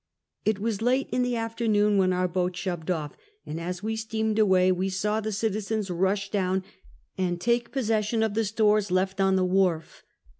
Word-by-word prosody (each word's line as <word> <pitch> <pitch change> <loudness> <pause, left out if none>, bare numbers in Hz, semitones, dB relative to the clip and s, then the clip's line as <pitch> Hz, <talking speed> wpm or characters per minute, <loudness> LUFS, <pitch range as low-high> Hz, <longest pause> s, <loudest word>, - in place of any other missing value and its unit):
It 215 -1 +2
was 215 0 -2
late 255 +3 +2
in 250 - +1
the 245 -1 0
afternoon 220 -3 +1
when 185 -1 +3
our 180 0 +1
boat 180 0 -1
shoved 180 -2 -4
off, 155 -5 -2 0.3
and 155 +2 -5
as 180 +2 -5
we 220 +1 -1
steamed 220 0 -1
away 185 -3 +4
we 185 +1 0
saw 210 +3 -1
the 215 0 -3
citizens 215 -1 -2
rush 195 +3 0
down 190 -2 0 0.6
and 175 -2 0
take 235 +5 +1
posses^. 265 -4 -2
346 - - -3
Half 220 -1 +3
a - - -1
Centuey. 210 - -4
sion 225 -1 +1
of 220 -2 0
the 225 +1 0
stores 210 -1 +2
left 190 +1 0
on 190 0 +3
the 185 -1 +2
wharf. 180 -3 0
200 Hz, 215 wpm, -26 LUFS, 185-220 Hz, 0.6 s, away